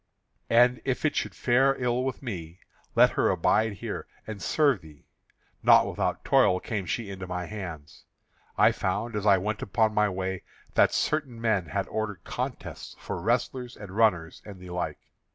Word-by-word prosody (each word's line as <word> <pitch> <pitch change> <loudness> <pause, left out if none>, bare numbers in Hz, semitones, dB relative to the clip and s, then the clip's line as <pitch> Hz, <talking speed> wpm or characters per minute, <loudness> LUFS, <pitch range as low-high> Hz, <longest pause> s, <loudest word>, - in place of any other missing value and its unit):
And 125 +1 +4
if 130 +3 -1
it 155 - +1
should - - -2
fare 135 +2 +3
ill 125 0 0
with 135 +1 -4
me, 85 -8 -6 0.4
let - - +6
her - - +2
abide 110 0 +2
here - - -6 0.2
and 110 -3 -7
serve 140 - +2
thee. 75 -2 -16 0.6
Not - - +6
without - - -2
toil 90 - +4
came 100 -3 -4
she 105 +2 -3
into 95 -1 -7
my 90 0 -3
hands. 85 -7 -8 0.5
I - - +6
found 115 +2 -2
as 105 0 -1
I 100 -1 +7
went 105 +4 -3
upon 110 +3 +1
my 105 0 +3
way 95 -1 -3 0.3
that - - +4
certain 140 -6 -1
men 110 -6 +1
had - - -2
ordered 105 -4 -4
contests - - -5
for - - -5
wrestlers 120 +3 -1
and 105 -3 -9
runners, 90 -7 +2
and 100 -3 -10
the 90 -1 -10
like. 90 0 -3
105 Hz, 170 wpm, -27 LUFS, 90-120 Hz, 0.6 s, I